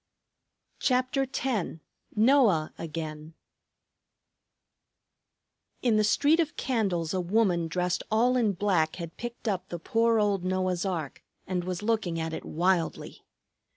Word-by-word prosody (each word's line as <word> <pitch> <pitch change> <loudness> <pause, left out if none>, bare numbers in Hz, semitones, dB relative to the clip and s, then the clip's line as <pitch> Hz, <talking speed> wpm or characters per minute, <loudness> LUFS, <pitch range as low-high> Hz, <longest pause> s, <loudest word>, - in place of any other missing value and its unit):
CHAPTER 255 +1 +1
X 240 -12 -2 0.4
NOAH 220 - +4
AGAIN 155 -1 -6 2.5
In 235 -4 +3
the 215 - +3
street 290 +9 +3
of 320 -3 0
candles 195 - -1
a 185 - 0
woman 180 -3 +1
dressed 180 +1 -1
all 240 +4 +3
in 225 -5 +2
black 175 -5 +1
had 170 -2 -7
picked 240 0 -7
up 190 -3 -2
the 175 - -4
poor 230 +6 +2
old 200 -3 +1
Noah's 185 0 0
ark 165 -7 -4 0.2
and 180 -1 -2
was 180 +2 -4
looking 210 -7 0
at 160 0 -3
it - - -5
wildly. 175 +1 -1
190 Hz, 125 wpm, -28 LUFS, 170-230 Hz, 2.5 s, NOAH